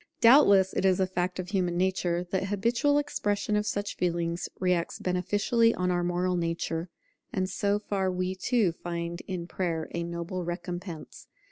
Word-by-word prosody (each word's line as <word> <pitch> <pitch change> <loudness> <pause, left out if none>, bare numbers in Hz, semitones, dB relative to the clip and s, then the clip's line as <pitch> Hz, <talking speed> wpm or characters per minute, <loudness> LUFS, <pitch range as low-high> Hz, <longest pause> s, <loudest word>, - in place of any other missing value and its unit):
Doubtless 200 -7 +6
it - - -1
is 190 -1 +3
a 190 - +3
fact 180 -1 -2
of 185 -1 -4
human 180 -3 0
nature, 180 -1 +1
that 190 0 0
habitual 235 +8 +2
expression 210 -8 0
of 210 0 0
such 205 0 -2
feelings 170 -1 -1
reacts 180 -2 0
beneficially 205 +6 +2
on 180 0 0
our 175 0 +1
moral 180 +1 0
nature; 165 0 -2 0.4
and 185 -1 -1
so 200 +2 0
far 195 -2 -1
we, 185 +1 -1
too, 200 0 +1
find 170 0 -5
in 180 -3 -4
Prayer 170 -3 -2
a 170 - -2
noble 170 +2 -4
recompense. 175 -1 -6
185 Hz, 160 wpm, -28 LUFS, 175-200 Hz, 0.4 s, Doubtless